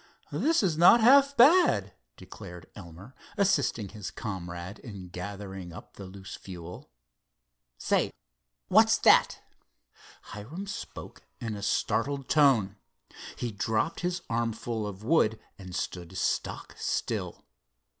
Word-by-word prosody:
"This 245 - +2
is 165 -5 0
not 180 +7 +8
half 275 +4 +6
bad," 250 - +5 0.2
declared 90 +1 -11
Elmer, 95 +5 -12 0.2
assisting 140 - +1
his 105 -3 -7
comrade 90 -2 -6
in 100 -6 -10
gathering 95 0 -7
up - - -12
the 100 - -10
loose 95 0 -10
fuel. 90 -4 -10 0.9
"Say, - - +1 0.6
what's - - +5
that?" - - +4 0.9
Hiram 140 - -7
spoke 200 0 -8 0.2
in 115 -3 -4
a 100 - -7
startled 125 +7 -1
tone. 120 -10 +3 0.6
He 120 - -4
dropped 110 +8 -1
his 180 0 -2
armful 115 -1 -2
of 100 0 -8
wood 110 -5 +2 0.2
and 90 -2 -9
stood 90 +1 -5
stock - - -2
still. - - -3
110 Hz, 115 wpm, -28 LUFS, 95-150 Hz, 0.9 s, not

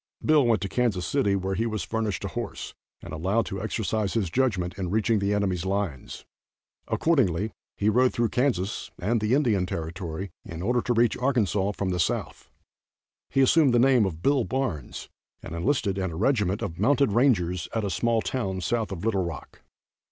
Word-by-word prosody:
Bill 155 -2 +5
went 110 -5 +2
to - - -1
Kansas 100 -5 0
City, 100 -3 +1
where 95 0 -2
he 115 +4 0
was 110 -6 -3
furnished 110 -1 -2
a - - -3
horse, - - -5 0.3
and - - -8
allowed 95 +8 0
to 95 0 -5
exercise 110 -1 -2
his 100 -7 0
judgment 100 -9 0
in 90 -2 -2
reaching 110 +2 +2
the 100 +1 0
enemy's 95 -4 0
lines. 95 -8 -3 0.6
Accordingly, 110 - +1 0.3
he 105 - 0
rode 125 +4 +4
through 120 -1 0
Kansas 115 -7 -1
and 110 +4 0
the 110 +4 +2
Indian 110 -11 +2
Territory 85 +2 -5
in 85 +1 -7
order 120 +4 +1
to 120 - 0
reach 115 0 +3
Arkansas 105 -7 +1
from 95 -1 -2
the 90 - -1
south. 80 - -2 0.8
He 135 - +2
assumed 135 -1 +4
the - - +5
name 125 -4 +4
of 85 -2 -7
Bill 140 0 +3
Barnes, 125 - -3 0.4
and - - -7
enlisted 100 - 0
in 95 -1 -1
a 80 - -7
regiment 105 - +1
of 85 +1 -5
mounted 140 +2 +3
rangers 95 -8 +2
at 110 -2 0
a 100 - -2
small 115 +1 +1
town 95 -8 -2
south 115 +1 -1
of 95 +1 -5
Little 100 -4 +1
Rock. 85 -4 -7
105 Hz, 185 wpm, -26 LUFS, 95-120 Hz, 0.8 s, Bill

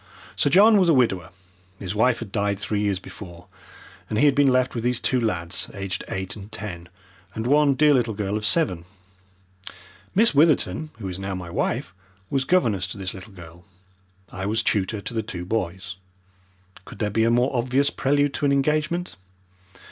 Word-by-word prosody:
Sir - - +2
John 210 +7 +6
was 180 -3 +3
a 160 - +5
widower 95 -10 +1 0.5
his 95 0 -5
wife 115 +3 +2
had 115 -4 -8
died 100 -1 0
three 105 0 -2
years 100 -2 0
before 90 -2 -11 0.6
and 105 - -2
he 145 - +4
had 145 - +5
been 140 0 +3
left 130 0 +2
with 115 - -4
these 125 -1 0
two 130 -2 +1
lads 85 -7 -2
aged 100 -1 -4
eight 95 -1 -3
and 105 +1 -11
ten, 90 -5 -7 0.5
and 110 - -3
one 145 +1 +4
dear 150 +2 +5
little 120 -5 +1
girl 100 0 -2
of 105 - -3
seven. 100 - +1 1.3
Miss 220 +1 +4
Witherton, 155 +1 +2
who 105 -4 -6
is 90 0 -5
now 95 0 -4
my 90 -2 -7
wife, 85 +1 -2 0.4
was 135 -1 0
governess 110 - +2
to 100 - -7
this 95 -2 -4
little 95 +2 -11
girl. 85 -1 -13 0.7
I 95 0 -4
was 110 +2 0
tutor 100 +1 0
to 120 - -7
the 110 - 0
two 95 -6 -7
boys. 95 -2 -3 0.9
Could - - -12
there 105 0 -1
be 110 +2 +2
a 115 - +3
more 125 +3 +2
obvious 130 +4 +1
prelude 145 +1 +1
to - - -2
an - - +2
engagement? 155 - 0
110 Hz, 185 wpm, -24 LUFS, 95-135 Hz, 1.3 s, John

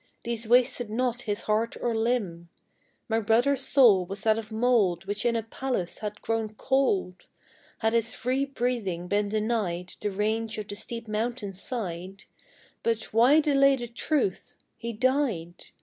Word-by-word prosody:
These 230 -1 -3
wasted 245 -1 +3
not 245 +2 -1
his 205 +1 -1
heart 220 +2 0
or 235 -2 -1
limb; 215 -8 -1 0.6
My 225 -1 +1
brother's 240 +5 +2
soul 240 -9 +5
was 195 +3 -7
of 220 -1 +5
that 225 0 -6
mould 220 -6 +2
Which 205 +4 -1
in 235 - +1
a 225 - -1
palace 225 -5 -3
had 210 0 -6
grown 225 -1 -2
cold, 210 -9 0 0.5
Had 220 0 0
his 230 -1 0
free 255 +3 0
breathing 235 -10 -2
been 205 +1 +1
denied 210 -5 -1
The 210 - 0
range 220 +3 -1
of 210 -1 -5
the 205 - -4
steep 230 +2 -7
mountain's 215 -3 -3
side; 190 -5 -5 0.6
But 225 -2 -2
why 255 +8 +6
delay 275 -2 +4
the 240 -2 -5
truth? 240 - -1 0.2
he 235 - -5
died. 230 - 0
225 Hz, 155 wpm, -27 LUFS, 205-245 Hz, 0.6 s, why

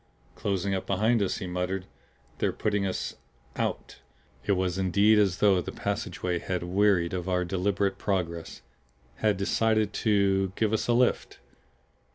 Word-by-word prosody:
"Closing 100 -1 -1
up 95 - -3
behind 110 +4 +2
us," 100 - 0
he - - -5
muttered. 90 +1 -3 0.5
"They're - - +1
putting 105 -2 -1
us 95 - -4 0.4
out." - - -3 0.5
It 100 - +2
was, 95 -1 -1
indeed, 100 +4 +4
as 95 -4 +2
though 100 -3 +4
the - - -6
passageway 100 -4 -3
had 90 0 -3
wearied 95 -1 +2
of 90 0 -3
our 90 -1 +1
deliberate 95 +2 0
progress. 85 -5 -3 0.5
Had 105 -3 +1
decided 110 +1 +1
to 95 -3 +2
give 110 -1 0
us 110 - 0
a 120 - +3
lift. 125 +1 +1
95 Hz, 150 wpm, -27 LUFS, 90-105 Hz, 0.5 s, indeed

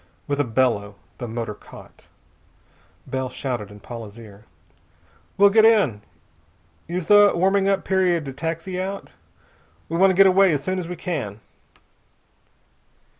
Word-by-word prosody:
With 145 0 -2
a - - +3
bellow, 115 -5 0 0.2
the 120 - -5
motor 115 -1 -4
caught. - - -16 1.0
Bell 130 -1 -3
shouted 125 -5 -5
in 105 0 -14
Paula's 115 -2 -9
ear. 110 -2 -14 0.9
"We'll 200 0 +6
get 220 +1 +5
in. 205 - +3 0.9
Use 175 +1 -3
the 205 +2 +6
warming 195 +2 +2
up 195 -1 0
period 180 -4 +1
to 135 - -6
taxi 165 +5 -4
out. 195 +1 -6 0.8
We 165 - -2
want 195 +2 +5
to 190 - +1
get 195 +1 +6
away 190 -1 +5
as 140 -2 -2
soon 185 0 -2
as 175 - -5
we 180 - -5
can." 135 - -5
165 Hz, 145 wpm, -22 LUFS, 120-190 Hz, 1.0 s, We'll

